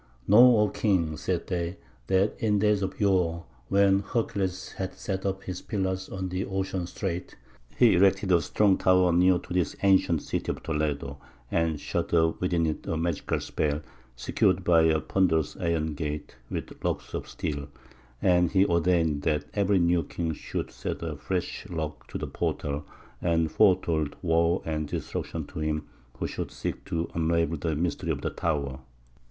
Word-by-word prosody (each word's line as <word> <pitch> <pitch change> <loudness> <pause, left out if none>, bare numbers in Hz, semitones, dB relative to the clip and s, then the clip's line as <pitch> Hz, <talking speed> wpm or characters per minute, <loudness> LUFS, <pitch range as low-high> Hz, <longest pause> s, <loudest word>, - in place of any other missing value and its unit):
"Know, 120 +4 +8
O 105 0 +4
king," 90 -7 +1
said 85 +4 -2
they, 85 0 -3 0.3
"that 95 +2 +2
in 105 -2 +2
days 105 0 +2
of 95 -1 -3
yore, 90 -4 +2 0.3
when 100 0 +4
Hercules 100 -3 -2
had 95 -1 -5
set 95 -1 -3
up 95 0 -3
his 90 -1 -5
pillars 95 -2 -2
at 95 -1 -4
the 90 +1 -1
ocean 95 -2 -2
strait, 90 -1 -4 0.4
he 115 - +6
erected 95 +1 +3
a 85 -2 +5
strong 100 +4 +2
tower 90 -1 +4
near 90 +1 +5
to 90 - -7
this 90 -2 0
ancient 95 -5 +4
city - - -2
of - - -8
Toledo, 75 -3 -2 0.3
and 80 -3 +1
shut 85 - -2
up 80 0 +2
within 90 -2 +1
it 80 -1 -3
a 80 - -1
magical 80 -1 -1
spell, 75 0 -1 0.3
secured 90 +8 +1
by 85 -2 +5
a 80 -1 +3
ponderous 80 -2 +1
iron 80 -2 0
gate 75 -2 -5
with - - -6
locks - - -2
of - - -4
steel; 70 -2 -4 0.6
and 90 -1 +3
he 95 0 +5
ordained 85 -4 +2
that 75 -1 0
every 100 -1 +2
new 85 -1 +3
king 80 +1 -3
should - - -5
set - - -5
a 80 -2 -3
fresh 90 +5 -3
lock 80 -3 -5
to - - -5
the - - -3
portal, 70 +1 -2 0.4
and 80 -2 +1
foretold 85 -7 +2
woe 85 +1 +2
and 75 -1 -2
destruction - - -4
to - - -8
him 75 -1 -1 0.3
who - - -2
should - - -4
seek - - -5
to 85 0 -2
unravel 85 0 +1
the 80 +1 -1
mystery 85 +3 -2
of - - -1
the - - -2
tower. 70 -5 -2
85 Hz, 170 wpm, -27 LUFS, 80-95 Hz, 0.6 s, Know